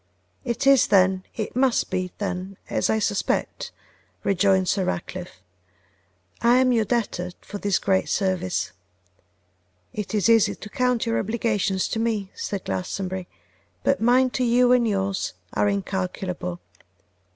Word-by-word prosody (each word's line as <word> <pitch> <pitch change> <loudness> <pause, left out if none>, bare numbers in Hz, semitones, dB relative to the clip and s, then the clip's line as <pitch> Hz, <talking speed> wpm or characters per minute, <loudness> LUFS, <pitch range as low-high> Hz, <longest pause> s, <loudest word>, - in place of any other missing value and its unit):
'It 240 +3 -2
is, 275 -2 +6
then, 190 -1 +4
it 215 0 -4
must 255 -1 +2
be 185 -1 -1
then 190 -1 -4
as - - +1
I 220 - +3
suspect,' 205 -2 -1 0.5
rejoined 190 -1 +3
Sir 195 - +1
Ratcliffe. 180 - -5 1.0
'I 235 +1 +5
am 255 0 +4
your 225 -3 +2
debtor 195 -6 -1
for 205 - -8
this 200 -3 +1
great 190 -1 +1
service.' 185 -2 0 1.2
'It 210 0 -4
is 210 - +2
easy 225 -2 +4
to 210 - -10
count 250 -2 +1
your 230 0 +1
obligations 210 -3 0
to 225 - -2
me,' 215 -4 -1
said 200 -2 -4
Glastonbury, 180 - -3 0.6
'but 275 - +2
mine 250 +2 +4
to 255 - -1
you 245 +1 +4
and 245 -2 +4
yours 195 -2 -1 0.2
are 205 - +2
incalculable. 185 -2 -3
200 Hz, 140 wpm, -24 LUFS, 185-235 Hz, 1.2 s, is